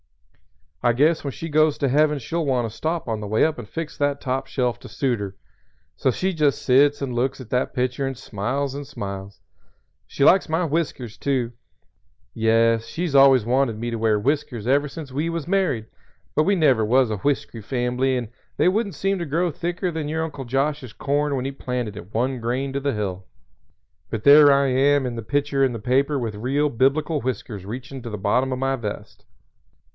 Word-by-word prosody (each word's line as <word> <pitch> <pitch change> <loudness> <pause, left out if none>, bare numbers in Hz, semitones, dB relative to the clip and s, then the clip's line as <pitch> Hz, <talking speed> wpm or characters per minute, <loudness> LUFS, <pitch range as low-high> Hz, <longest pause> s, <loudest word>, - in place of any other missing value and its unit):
I 120 -1 +3
guess 155 +6 +2
when 140 - -2
she 165 - -6
goes 155 -1 +3
to 140 - 0
Heaven 150 +3 +3
she'll 165 +6 -3
want 130 -5 +1
to 110 - -10
stop 160 -1 -2
on 110 -2 -2
the 105 - -5
way 110 +2 +3
up 160 -4 -1
and 110 - -9
fix 165 -1 -5
that 145 -1 +1
top 135 +1 -2
shelf 125 -3 -1
to - - -11
suit 125 -5 -1
her. 100 -2 -5 0.6
So - - +1
she 185 +9 0
just 150 -4 +1
sits 140 +2 +4
and 130 -3 -3
looks 130 +3 -1
at 125 -3 -11
that 125 +2 0
picture 130 +1 -1
and 135 -2 -4
smiles 130 +5 -3
and 140 0 -6
smiles. 100 -2 -7 0.7
She 140 - -2
likes 185 +3 +5
my 165 +3 +1
whiskers, 140 -7 -3
too. 130 -4 0 0.8
Yes, 115 0 +2
she's 165 +3 -3
always 135 -4 +6
wanted 125 -2 +1
me 120 +2 -3
to 115 - -2
wear 110 -1 +2
whiskers 125 -2 -1
ever 140 +4 +2
since 145 -2 -8
we 150 +5 -1
was 165 -3 -4
married, 180 - +1 0.5
but 155 - +2
we 200 - +3
never 135 -10 +3
was 125 +2 +3
a 105 - -1
whiskery 120 -1 -2
fambly 125 +3 0
and 120 -3 -4 0.3
they - - +3
wouldn't 200 -1 0
seem 195 +4 0
to 170 - -3
grow 170 +4 0
thicker 175 +3 -3
than 160 -2 -3
your 160 +1 -1
Uncle 145 -4 -6
Josh's 135 -1 -1
corn 145 0 0
when 130 -1 -2
he 135 - -2
planted 125 -5 -4
it 100 0 -10
one 125 +3 -1
grain 130 +4 -2
to 140 - -1
the 140 0 -1
hill. 95 -3 -4 0.8
But 110 -2 -4
there 145 0 +8
I 140 0 +4
am 135 +2 +3
in 120 -2 -3
the 115 - -4
picture 140 +4 0
in 130 -2 +2
the - - -4
paper 135 +6 +1
with 115 -4 -3
real 135 +8 0
biblical 140 +5 +1
whiskers 105 -5 -4
reachin' 130 +5 -7
to 120 - -7
the 105 - -5
bottom 125 +7 +1
o' - - 0
my 135 +1 0
vest." 105 -5 -7
135 Hz, 205 wpm, -23 LUFS, 120-145 Hz, 0.8 s, there